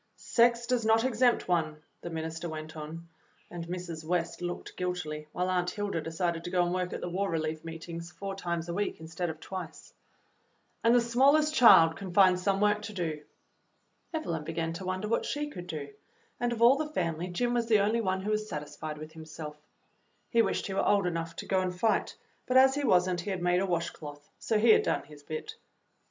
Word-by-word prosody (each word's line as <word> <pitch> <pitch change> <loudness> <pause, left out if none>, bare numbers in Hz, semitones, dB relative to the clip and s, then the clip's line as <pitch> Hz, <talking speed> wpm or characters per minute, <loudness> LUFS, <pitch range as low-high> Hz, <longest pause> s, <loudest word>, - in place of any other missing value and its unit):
"Sex 235 0 +2
does 245 -1 0
not 225 +1 +4
exempt 250 -1 +2
one," 160 -4 0 0.2
the 175 - -6
minister 160 +1 -4
went 155 0 -7
on, 160 +2 -7 0.4
and 170 -1 -6
Mrs. 175 -3 -5
West 170 0 -1
looked 175 0 -5
guilty, 170 -4 -3
while 180 0 -1
Aunt 180 -1 +1
Hilda 205 -5 -2
de 165 - -6
cided 170 0 -1
to 175 - -4
go 180 -1 +2
and 175 - -1
work 180 -1 -1
at - - -5
the - - -3
War 195 +3 -1
Relief 155 -1 -2
meetings 165 +1 -7
four 195 +1 -5
times 170 -3 -3
a 170 - -3
week 205 +3 -2
instead 160 +2 -4
of 160 0 -6
twice. 185 0 -8 0.9
"And 230 +1 +5
the 245 - +5
smallest 280 +6 +4
child 185 - +7
can 190 -2 -6
find 185 -2 +6
some 195 +1 +1
work 210 0 +3
to 210 0 -7
do." 160 -5 -3 0.9
Evelyn 170 - -3
began 165 +1 -3
to 185 +3 -7
wonder 185 +3 -2
what 230 - +1
she 295 0 -3
could 180 -6 -8
do, 150 -4 -5 0.5
and 245 0 0
of 235 -1 0
all 250 +4 +7
the 305 0 -2
family 170 - -2
Jim 240 +7 -1
was 235 -1 0
the 215 -3 +5
only 220 +3 +2
one 190 -2 0
who 210 - -1
was 215 0 -1
sat 150 - -3
isfied 150 +1 -7
with 155 +1 -9
himself. 155 -1 -8 0.8
He 235 - +5
wished - - 0
he 195 - -4
were 195 - 0
old 200 -2 +3
enough 165 -1 -3
to - - -6
go 190 -1 +1
and 180 -1 -3
fight, 225 +1 +1 0.3
but 255 - +3
as 265 0 +7
he 290 +1 -2
was 180 -8 +4
n't, 180 -2 -1
he 205 - -5
had 185 -3 -3
made 180 0 +3
a 195 - 0
washcloth, 150 -4 -4
so 220 - +1
he 225 +2 +6
had - - +6
done - - 0
his 145 0 -14
bit. 155 - -6
180 Hz, 220 wpm, -30 LUFS, 165-215 Hz, 0.9 s, child